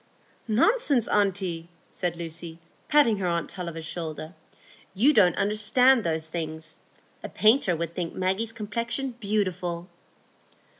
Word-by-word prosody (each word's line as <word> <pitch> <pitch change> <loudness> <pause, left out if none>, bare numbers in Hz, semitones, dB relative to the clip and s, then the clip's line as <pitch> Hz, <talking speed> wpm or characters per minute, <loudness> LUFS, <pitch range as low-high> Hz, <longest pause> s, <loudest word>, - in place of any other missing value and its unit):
"Nonsense, 270 - +2
aunty!" 185 -5 0 0.2
said 175 -2 -2
Lucy, 165 0 -7 0.3
patting 290 -8 +4
her 190 -2 -2
aunt 170 -2 -2
Tulliver's 170 -3 -6
shoulder, 160 0 -5 0.6
"you 260 +10 +4
don't 185 -8 +4
understand 220 +5 +4
those 160 -2 -1
things. 160 -1 -6 0.5
A - - -5
painter 215 -4 +3
would 165 0 -4
think 170 -2 -4
Maggie's 190 +5 0
complexion 230 +4 -3
beautiful." 185 -5 -2
185 Hz, 115 wpm, -26 LUFS, 170-225 Hz, 0.6 s, patting